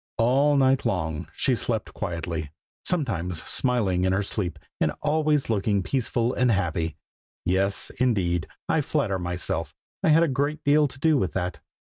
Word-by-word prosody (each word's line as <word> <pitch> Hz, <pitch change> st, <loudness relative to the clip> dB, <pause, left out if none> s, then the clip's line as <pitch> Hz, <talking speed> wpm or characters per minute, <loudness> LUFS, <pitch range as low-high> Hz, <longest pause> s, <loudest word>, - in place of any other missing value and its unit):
All 135 Hz, +5 st, +3 dB
night 135 Hz, -1 st, +3 dB
long 80 Hz, -4 st, -2 dB
she 130 Hz, -, +2 dB
slept 115 Hz, -2 st, -2 dB
quietly, 85 Hz, -4 st, -4 dB, 0.3 s
sometimes 90 Hz, -, -1 dB
smiling 105 Hz, -8 st, +1 dB
in 95 Hz, 0 st, +2 dB
her 100 Hz, +2 st, +1 dB
sleep, 90 Hz, -5 st, -3 dB, 0.2 s
and 75 Hz, -, +1 dB
always 150 Hz, -1 st, +2 dB
looking 100 Hz, -2 st, +1 dB
peaceful 120 Hz, 0 st, 0 dB
and 125 Hz, 0 st, +2 dB
happy. 85 Hz, -5 st, -1 dB, 0.5 s
Yes, 95 Hz, +2 st, +1 dB
indeed, 95 Hz, -9 st, +1 dB, 0.2 s
I 160 Hz, -, +2 dB
flatter 120 Hz, -10 st, 0 dB
myself 85 Hz, -4 st, -3 dB, 0.3 s
I -, -, +4 dB
had 160 Hz, +2 st, +6 dB
a -, -, +3 dB
great 145 Hz, +2 st, -1 dB
deal 145 Hz, +1 st, +4 dB
to 130 Hz, -, -12 dB
do 150 Hz, +1 st, +3 dB
with 90 Hz, -8 st, -1 dB
that. 90 Hz, -4 st, -2 dB
105 Hz, 155 wpm, -25 LUFS, 90-135 Hz, 0.5 s, had